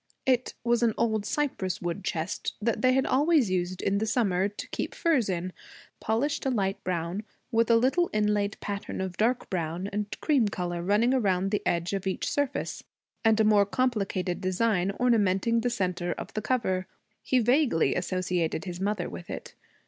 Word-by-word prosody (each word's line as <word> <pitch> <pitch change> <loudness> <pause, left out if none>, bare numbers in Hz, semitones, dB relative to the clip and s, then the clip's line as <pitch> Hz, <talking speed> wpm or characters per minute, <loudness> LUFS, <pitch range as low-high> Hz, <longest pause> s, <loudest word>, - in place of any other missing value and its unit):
It 255 -1 +1
was 235 -1 +2
an 230 -2 +2
old 220 -3 0
cypress 250 - -1
wood 175 +2 -3
chest 165 -1 -3
that 220 0 0
they 255 +2 +4
had 265 +1 +2
always 285 - +3
used 180 0 -1
in 200 0 +1
the 220 - -1
summer, 200 -5 +1
to 205 - -8
keep - - -4
furs 295 - +2
in, 180 0 -2 0.5
polished 235 +7 0
a 270 - +1
bright 195 -6 -1
brown, 175 +2 -2 0.3
with 230 0 +2
a 230 - +6
little 265 +10 +3
inlaid 210 -1 +1
pattern 200 -1 -4
of 190 -1 -3
dark 240 +5 +1
brown 170 0 -2
and 210 0 -3
cream 275 -8 +3
color 175 -3 -3
running 210 +7 +3
around 195 -6 +1
the 210 - +1
edge 170 +2 0
of 195 0 -2
each 190 - -1
surface, 285 -1 -2 0.4
and 220 -1 +4
a - - +5
more 210 -2 +4
complicated 195 -7 -1
design 185 0 +1
ornamenting 230 -1 +2
the 245 - +1
centre 180 -6 -1
of - - -8
the 215 - -2
cover. 190 -6 0 0.3
He 260 - +1
vaguely 245 - +3
associated 180 -2 -1
his 180 -1 -5
mother 200 -2 -1
with 175 - -9
it. - - -7
205 Hz, 180 wpm, -28 LUFS, 185-235 Hz, 0.5 s, a